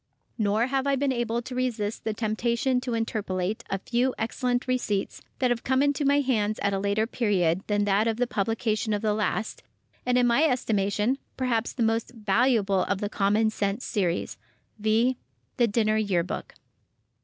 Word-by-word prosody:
Nor 215 +2 +2
have 270 +1 -1
I 280 - +3
been 275 0 +1
able 235 -1 -1
to 260 - -7
resist 235 -4 -2
the 220 - 0
temptation 235 +4 0
to 250 -2 -2
interpolate 210 -3 -2
a 195 - 0
few 245 +6 0
excellent 245 +2 -1
receipts 235 -6 -1 0.2
that 255 -2 +1
have 235 -1 -1
come 260 +1 +2
into 285 0 +1
my 285 +1 +4
hands 215 -6 0
at 200 0 +1
a 195 - 0
later 200 +2 +1
period 190 -7 +1
than 205 -1 +1
that 205 +2 +2
of 225 -1 0
the 245 - +2
publication 220 0 -1
of 205 +1 -2
the 215 -1 +2
last, 215 +1 -2 0.4
and 250 0 +2
in 250 - +4
my 245 +6 +4
estimation, 220 -2 +1 0.2
perhaps 240 -3 0
the 240 - -1
most 225 +2 0
valuable 215 -2 +2
of 200 - -1
the 205 - -2
"Common 210 +2 +2
Sense 205 +2 -2
Series," 180 -5 -1 0.4
viz.: 220 +4 +3 0.4
"THE 240 - +4
DINNER 215 0 +1
YEAR 200 -5 +1
BOOK." 180 - -6
225 Hz, 180 wpm, -26 LUFS, 205-250 Hz, 0.4 s, my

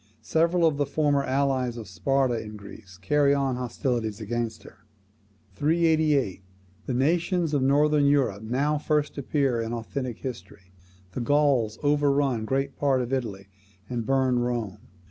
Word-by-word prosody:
Several 170 +2 +2
of 155 -3 +2
the 145 -1 0
former 145 -2 +1
allies 130 -2 0
of 110 -3 -7
Sparta 130 +5 0
in 105 0 -9
Greece 100 -2 -13
carry 140 +10 +2
on 135 -2 0
hostilities 120 -3 -2
against 115 +1 -3
her. 110 - -15 0.7
388. 155 - +1 0.5
The 130 - -1
nations 165 +4 +1
of 145 - +2
Northern 145 +2 +3
Europe 135 -8 +2
now 140 +7 0
first 150 -1 -1
appear 135 -3 0
in 115 +1 -4
authentic 120 +1 -4
history. 95 -6 -9 0.4
The 120 - -4
Gauls 135 -5 +2
overrun 140 -5 +2
great 135 +3 -1
part 135 -3 +2
of 125 +2 -5
Italy, 105 -7 -3 0.4
and 120 -2 -2
burn 130 0 +2
Rome. 120 -5 -2
130 Hz, 145 wpm, -26 LUFS, 115-145 Hz, 0.7 s, Northern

